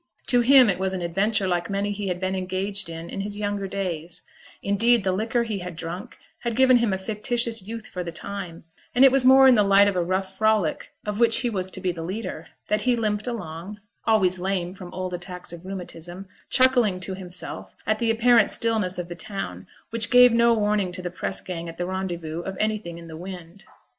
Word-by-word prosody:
To 245 -2 +5
him 260 0 +7
it 195 -3 0
was 190 0 -1
an 180 - -4
adventure 195 +4 0
like 175 0 -1
many 200 +1 -1
he 205 0 -4
had 180 -1 -2
been 185 0 -1
engaged 190 +1 -2
in 165 0 -7
in 195 - -4
his 205 +1 -5
younger 205 -1 -2
days; 175 -4 -3 0.4
indeed, 225 +3 +3
the 190 - +1
liquor 225 +5 0
he 215 -4 -3
had 180 -2 -7
drunk 170 +3 -7 0.2
had 235 -2 -3
given 260 0 +6
him 235 -3 +1
a 190 - 0
fictitious 225 +3 0
youth 225 0 -6
for 180 - -5
the 170 - -5
time; 180 -1 -6 0.3
and 255 +2 +7
it 270 - +7
was 270 -1 +3
more 265 0 +8
in 260 - +8
the 215 - +4
light 200 0 +5
of 200 - 0
a 180 - +1
rough 190 +2 -2
frolic 215 -7 +1
of 210 0 -3
which 230 -1 +5
he 240 -1 -1
was 190 -3 -2
to - - -2
be 185 - -1
the 170 -1 -7
leader, 175 -2 -5 0.2
that 210 0 +1
he 245 +2 +2
limped 215 -1 -1
along 195 -3 -6
( - - -43
always 185 -5 +3
lame 180 -1 -2
from 185 -2 -10
old 185 -1 -4
attacks 180 0 -7
of 170 +2 -10
rheumatism), 180 0 -7 0.2
chuckling 245 -7 +4
to 190 +1 -2
himself 185 -1 -7
at 215 0 0
the 230 - +1
apparent 230 -1 +4
stillness 215 -6 0
of 180 -1 -4
the 175 - -6
town, 195 +3 -6 0.2
which 230 0 +2
gave 250 -1 +7
no 235 0 +4
warning 210 -3 0
to 185 0 -6
the 175 - -4
press 185 +1 -3
gang 170 -2 -6
at 165 - -10
the 175 - -2
Rendezvous 175 -4 -4
of 190 +1 -6
anything 215 -6 -2
in 170 0 -11
the 160 - -9
wind. 180 +1 -9
195 Hz, 225 wpm, -24 LUFS, 180-220 Hz, 0.4 s, more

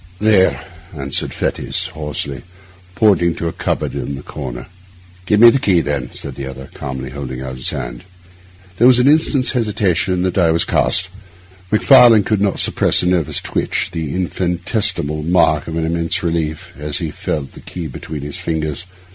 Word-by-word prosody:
'There,' 105 -2 +2 0.3
answered 70 -1 -2
Fettes - - -2
hoarsely, 75 -3 -4 0.5
pointing 95 -5 +3
to 85 - -3
a - - -2
cupboard - - -2
in 70 - -4
the 65 - -9
corner. 60 -4 -7 0.6
'Give 105 - +3
me 120 +1 +9
the 135 - +1
key, 95 -8 +3
then,' 70 -5 -2
said - - -6
the 70 -1 -6
other, 65 0 -9
calmly, 65 -1 -6
holding 65 -2 -6
out 65 -1 -6
his 65 - +2
hand. - - -6 0.7
There 120 - +5
was 125 -1 +6
an 125 +2 +3
instant's 145 -3 +3
hesitation, 105 -7 0
and 90 0 -1
the 95 - +1
die 90 -2 +2
was 80 +1 +2
cast. 95 0 +2 0.6
Macfarlane 115 -1 +6
could 105 -1 0
not 100 -2 0
suppress - - +4
a - - -1
nervous 90 -5 +1
twitch, - - -2
the 80 -2 -4
infinitesimal 90 -3 0
mark 80 -2 +2
of 80 0 -4
an 80 - -1
immense 85 +1 -1
relief, 80 -2 -3
as 75 0 -2
he 80 -3 -3
felt 70 -2 -4
the - - -13
key 90 -2 -7
between 75 +1 -7
his 70 0 -6
fingers. 80 +1 -3
85 Hz, 175 wpm, -17 LUFS, 70-95 Hz, 0.7 s, me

